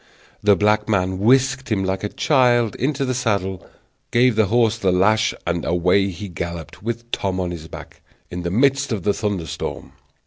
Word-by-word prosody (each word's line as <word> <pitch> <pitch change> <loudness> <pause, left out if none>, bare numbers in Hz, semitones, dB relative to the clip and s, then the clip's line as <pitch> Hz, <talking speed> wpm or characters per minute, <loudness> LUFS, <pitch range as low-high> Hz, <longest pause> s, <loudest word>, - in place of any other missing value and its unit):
The 105 -1 +5
black 105 +1 +1
man 95 -2 0
whisked 130 +3 +2
him 100 -3 +1
like 95 +1 -2
a 105 - -2
child 120 -6 +2
into 140 +2 -1
the 130 - -1
saddle, 100 -7 -1 0.5
gave 120 0 +3
the 110 -2 +3
horse 115 0 +2
the 95 -4 +2
lash, 110 +4 +3
and 85 -1 -1
away 90 +3 +2
he 95 +3 -7
galloped, 85 -1 -7
with 120 +2 -5
Tom 95 -1 -2
on 90 -1 -2
his 80 -2 -7
back, - - -11 0.3
in 90 - -4
the 85 - -3
midst 135 +6 +2
of 105 -6 -2
the 100 - +2
thunder 100 -6 -2
storm. 70 - -6
105 Hz, 185 wpm, -21 LUFS, 90-120 Hz, 0.5 s, The